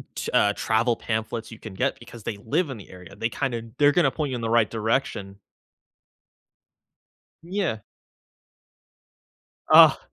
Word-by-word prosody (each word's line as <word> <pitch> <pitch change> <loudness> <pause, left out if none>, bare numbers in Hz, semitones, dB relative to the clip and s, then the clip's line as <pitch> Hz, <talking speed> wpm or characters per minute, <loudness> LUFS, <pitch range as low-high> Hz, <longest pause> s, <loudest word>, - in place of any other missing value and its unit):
t - - -4
uh, 105 - +4
travel 115 +2 +1
pamphlets 110 +1 -4
you 115 - -9
can 110 - -9
get 130 +7 -1
because 120 -1 -12
they 105 - -3
live 155 +7 0
in 135 - -5
the 100 - -13
area, 90 0 -13
they 115 +3 -2
kinda 120 -2 -3 0.2
they're 145 0 +6
gonna 155 -5 +3
point 150 -2 -3
you - - -2
in 120 - -5
the 115 - -2
right 115 -2 +3
direction. 110 -3 -2 2.1
Yeah. 175 - -2 1.9
Ugh. - - +9
115 Hz, 150 wpm, -25 LUFS, 110-135 Hz, 2.1 s, Ugh